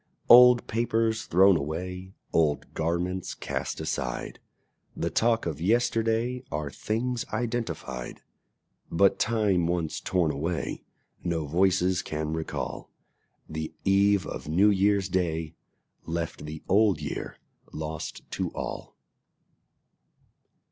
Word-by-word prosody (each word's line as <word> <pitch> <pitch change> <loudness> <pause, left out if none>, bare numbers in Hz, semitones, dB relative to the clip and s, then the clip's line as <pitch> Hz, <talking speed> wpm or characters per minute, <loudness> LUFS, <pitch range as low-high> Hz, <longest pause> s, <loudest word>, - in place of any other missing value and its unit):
Old 125 0 +9
papers 115 -1 0
thrown 95 +2 +5
away, 90 +5 -4 0.2
Old 75 -3 +1
garments 85 +3 -2
cast - - -4
aside, - - -3 0.6
The - - -2
talk 115 0 +2
of 80 -3 -4
yesterday, 115 +3 +1
Are 75 -1 -3
things 115 - -2
identified; 110 - -4 0.7
But 100 +3 +3
time 105 -7 +2
once 85 -3 -1
torn 90 -4 +1
away 80 +4 -3 0.4
No 85 -3 -1
voices 90 +3 +2
can 75 0 -3
recall: 80 0 -4 0.6
The 80 0 -5
eve 100 0 +4
of - - -6
New 95 +7 +4
Year's 100 0 +2
Day 85 -4 -1 0.5
Left 80 -2 -4
the 75 0 -7
Old 100 0 +4
Year - - -5 0.3
lost 80 0 -5
to - - -2
all. - - -6
90 Hz, 105 wpm, -27 LUFS, 80-110 Hz, 0.7 s, Old